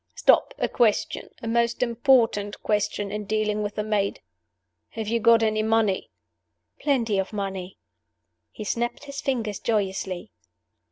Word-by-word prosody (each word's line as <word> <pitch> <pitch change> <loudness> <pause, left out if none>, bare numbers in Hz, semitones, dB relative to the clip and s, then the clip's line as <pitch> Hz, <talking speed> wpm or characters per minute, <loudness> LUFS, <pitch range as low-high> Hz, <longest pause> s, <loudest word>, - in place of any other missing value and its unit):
Stop! - - +4
A - - 0
question 225 -4 +1
a - - -3
most 235 +1 +1
important 235 -4 +2
question 205 -1 0
in 210 0 -4
dealing 215 0 0
with 205 0 -3
the 210 - -1
maid. 210 -2 0 0.7
Have 220 -1 -5
you 230 +2 +1
got 230 0 +5
any 215 -1 +2
money?" 220 -3 +1 0.7
"Plenty 235 -8 +1
of 190 - -2
money." 195 -3 -4 0.7
He - - -7
snapped 240 +5 -2
his 280 -1 -6
fingers 225 -7 -2
joyously. 190 - -2
215 Hz, 135 wpm, -25 LUFS, 205-235 Hz, 0.7 s, got